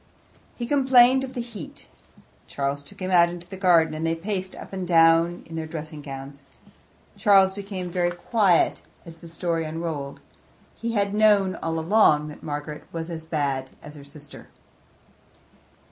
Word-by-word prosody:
He 240 - -4
complained 265 -1 +5
of 265 -1 -6
the 245 - -2
heat. 230 -8 -10 0.6
Charles 140 0 -3
took 200 +8 -13
him 185 0 -3
out 170 -1 +5
into 175 0 -9
the 190 - -8
garden, 175 -4 +3
and 155 +1 -5
they 165 0 0
paced 185 +2 -4
up - - -11
and 190 -2 -4
down 165 0 +4
in 165 - -10
their 160 -1 -4
dressing 155 -2 -7
gowns. 140 0 -9 0.8
Charles 195 -3 +5
became 195 -3 -6
very 175 -1 +1
quiet 180 +1 +1 0.2
as 165 -1 -12
the 170 0 -13
story 165 0 -2
unrolled; 155 -3 -5 0.6
he 230 0 -4
had 200 -2 0
known 205 -3 +4
all 165 0 -3
along 160 -4 +3
that 150 - -11
Margaret 150 0 -6
was 165 +1 -5
as 160 -1 -7
bad 140 -4 -2
as 150 - -10
her 145 -2 -12
sister. 145 +1 -12
170 Hz, 160 wpm, -24 LUFS, 155-195 Hz, 0.8 s, complained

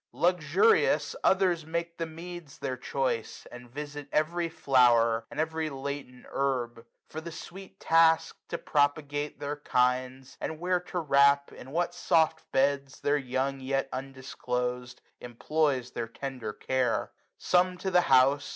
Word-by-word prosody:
Luxurious, 185 - +3
others 185 -4 +3
make 170 +2 -4
The 165 - -2
meads 170 -1 -9
their 130 -2 -3
choice, 130 -2 -3
and 125 0 -11
visit 145 +2 -7
every 170 +2 0
flower. 120 -6 +3
And - - -7
every 160 0 -1
latent 135 -2 -6
herb: 120 -4 -2 0.2
for 160 - -7
the 170 +1 -7
sweet 190 +4 -10
task. 165 0 +4
To - - -3
propagate 145 0 0
their 145 +1 -4
kinds, 130 -1 -1
and 160 -1 -4
where 180 +1 +1
to 180 +1 -7
wrap. 140 -3 +4
In 130 - -11
what 175 +4 -1
soft 160 -2 +1
beds, 140 0 +1
their 145 - +2
young 135 0 -2
yet 135 +1 -1
undisclosed, 125 -2 -4 0.2
260 - - -9
Employs 130 +1 -1
their 115 - -4
tender 125 -2 -6
care. 130 +3 -1 0.3
Some 180 0 +2
to 190 +1 -3
the 180 0 +5
house. 135 +2 +4
140 Hz, 140 wpm, -29 LUFS, 130-165 Hz, 0.3 s, the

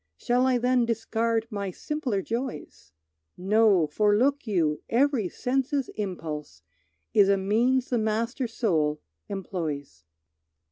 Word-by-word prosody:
Shall 250 +2 +1
I 255 -1 +3
then 245 0 +2
discard 225 0 0
my 200 -2 -3
simpler 245 - -3
joys? 230 - -5 0.5
No, 200 -2 +4
for 205 +7 +2
look 275 +2 +1
you, 165 -7 +1
every 245 -5 +2
sense's 270 - -1
impulse 155 - -6 0.5
Is 200 -2 +5
a 200 - +4
means 240 +7 +1
the 240 - +2
master 230 +4 -1
soul 160 -10 0 0.3
employs. 155 - -5
220 Hz, 120 wpm, -26 LUFS, 185-245 Hz, 0.5 s, Is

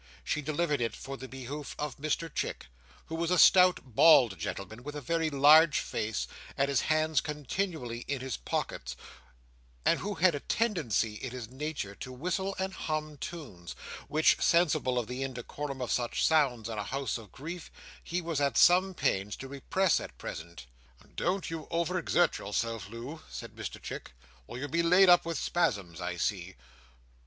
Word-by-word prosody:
She 150 - -1
delivered 150 -1 0
it 115 - -1
for 135 +1 -7
the 130 0 -8
behoof 135 +3 -7
of 150 -2 -4
Mr 155 +2 -2
Chick, - - -3 0.4
who - - -9
was 165 0 -1
a 180 - +3
stout 180 -1 +7
bald 125 - +5
gentleman, 100 +7 -5
with 145 +3 -7
a - - -3
very 165 +4 0
large 150 +2 +6
face, 105 0 -2 0.3
and 140 0 +2
his 135 -4 +2
hands 155 -2 +2
continually 150 -4 -3
in 140 -1 -1
his 130 0 -3
pockets, - - -3 0.9
and - - +4
who 205 +1 -3
had 175 +1 +4
a 145 - -2
tendency 150 - 0
in 125 +5 -6
his 120 -2 -7
nature 140 -7 -4
to 130 - -8
whistle 180 +8 -2
and 190 0 -2
hum 155 -2 -3
tunes, 115 - -7 0.3
which, 155 +1 +3
sensible 155 -7 +3
of 120 - 0
the 125 +4 -5
indecorum 135 +1 -4
of 120 - -3
such 120 -1 0
sounds 135 -8 +2
in 110 -2 -4
a - - -2
house 135 +2 -2
of 110 -3 -14
grief, 165 +5 -7 0.3
he 175 +1 -2
was 165 -3 -1
at 140 -4 +1
some 185 +2 +5
pains 100 -6 0
to 135 - -8
repress 160 +7 +1
at - - -9
present. 85 -2 -8 0.5
"Don't 185 -1 -1
you 160 -2 -5
over 170 +2 0
exert 175 0 +2
yourself, 110 +1 -3
Loo," 125 +8 -7
said - - -8
Mr - - -6
Chick, - - -7 0.3
"or - - -7
you'll 140 +3 -4
be 165 +4 +1
laid 180 +3 +6
up 175 -1 +6
with 165 -2 -2
spasms, 100 - -1
I - - -3
see. - - -2
145 Hz, 175 wpm, -30 LUFS, 120-165 Hz, 0.9 s, stout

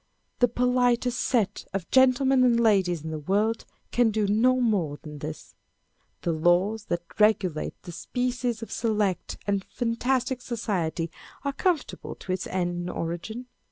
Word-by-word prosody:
The 245 - +5
politest 245 0 +1
set 210 -6 0
of 190 -3 -3
gentlemen 260 0 +5
and 240 -2 +4
ladies 190 -8 +3
in 160 - -5
the 155 - -3
world 205 +8 0 0.3
can 240 -2 +3
do 215 -1 0
no 245 +5 +3
more 190 - +1
than 150 -2 -8
this. 155 +2 -7 0.7
The 170 - +1
laws 180 +7 +2
that 175 -3 -2 0.2
regulate 195 -7 +2
this 175 -3 -8
species 245 -2 -2
of - - -8
select 210 -5 -1
and 200 -1 0
fantastic 250 +2 -1
society 180 -9 -2 0.3
are 280 -1 -1
conformable 345 +1 -1
to 185 - -7
its 185 0 -2
ends 175 -1 -1
and 175 +1 -4
origin. 175 +10 -4
215 Hz, 150 wpm, -26 LUFS, 175-245 Hz, 0.7 s, The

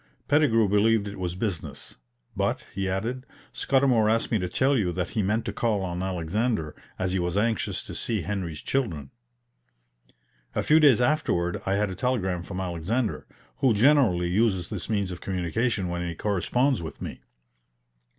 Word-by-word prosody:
Pettigrew 125 -8 +4
believed 105 +1 +3
it 100 -1 -7
was 90 -1 -3
business; 95 -5 -4 0.4
"but," - - -1
he 95 0 -2
added, 115 +7 -2 0.3
"Scudamour 130 -5 +3
asked 115 +1 +1
me 110 - +2
to 90 -1 -2
tell 135 +8 +2
you 100 -8 +1
that 90 +1 -2
he 110 - -1
meant 105 +4 0
to 100 - -3
call 105 -3 0
on 90 -1 -3
Alexander, 95 0 -1 0.2
as 95 -1 -1
he 95 - 0
was 90 +1 -1
anxious 110 +1 0
to - - -8
see 110 -6 -1
Henry's 90 -7 -4
children." 85 - -2 1.4
A - - 0
few 155 +1 +5
days 140 -6 +6
afterward 120 - +1
I 95 - +2
had 105 -1 0
a - - -5
telegram 95 -9 -1
from 90 +1 -6
Alexander, 95 +6 -2 0.3
who 125 -5 +3
generally 110 -8 +4
uses 95 -2 +1
this - - -5
means 100 -4 0
of 90 - -7
communication 95 +3 -1
when 85 0 -3
he 85 - -4
corresponds 115 - +1
with 80 - -7
me. - - -7
100 Hz, 170 wpm, -26 LUFS, 90-115 Hz, 1.4 s, days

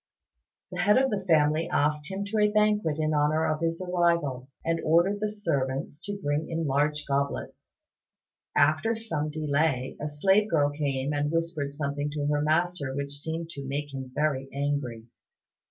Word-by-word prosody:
The - - -5
head 210 +3 +5
of 265 0 +3
the 200 -2 -1
family 155 -1 +3
asked 150 +1 +1
him 195 +1 -3
to 215 +2 -1
a 210 0 +5
banquet 210 -7 +2
in 155 0 0
honour 150 +2 +2
of 155 0 -1
his 165 +2 -1
arrival, 170 -8 +1 0.2
and 165 0 0
ordered 175 +6 +3
the 210 0 0
servants 145 -8 -2
to 205 0 -4
bring 145 -4 -1
in 165 0 -1
the - - -1
large 145 +2 +1
goblets. 140 0 -3 0.8
After 155 +10 +3
some 160 -10 -3
delay 150 -3 0
a 150 - -1
slave 190 +8 +2
girl 145 -5 +3
came 140 -1 -1
and 145 0 0
whispered 165 -4 -1
something 145 0 -2
to 145 -1 -2
her 145 0 +1
master 155 -2 0
which 140 0 -3
seemed 160 +2 -4
to 140 -3 -7
make 145 +1 -3
him 130 -1 -6
very 140 -3 0
angry. 140 -5 -2
150 Hz, 170 wpm, -27 LUFS, 145-170 Hz, 0.8 s, head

